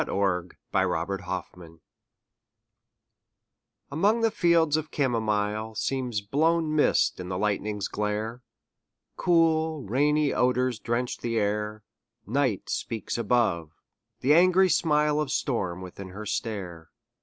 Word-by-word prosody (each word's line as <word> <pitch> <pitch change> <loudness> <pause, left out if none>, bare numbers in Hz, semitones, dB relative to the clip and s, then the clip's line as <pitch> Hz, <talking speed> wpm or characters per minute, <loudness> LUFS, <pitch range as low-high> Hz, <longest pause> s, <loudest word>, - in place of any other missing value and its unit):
THE - - -5
WINDOW 90 -3 0 0.4
ON 80 +1 -2
THE 100 0 -2 0.4
HILL 85 -1 -14 2.1
Among 205 +10 +2
the 225 -1 +3
fields 170 -5 +3
the 155 - +2
camomile 110 -7 -1
Seems 125 -2 -2
blown 155 +7 +1
mist 150 - +2
in 90 0 -6
the 90 - -2
lightning's 105 0 -1
glare: 105 +3 -3 0.7
Cool, 160 -3 +2
rainy 145 +6 +2
odors 125 -1 +1
drench 120 +2 -2
the 115 -1 -2
air; 105 0 -1 0.4
Night 125 -2 0
speaks 115 -2 -3
above; 105 -9 0 0.5
the 140 +4 +4
angry 185 +3 +5
smile 150 -2 +2
Of 145 -3 -3
storm 95 - -1
within 95 +1 -9
her 105 +3 -8
stare. 95 -6 -4
115 Hz, 120 wpm, -27 LUFS, 105-150 Hz, 2.1 s, angry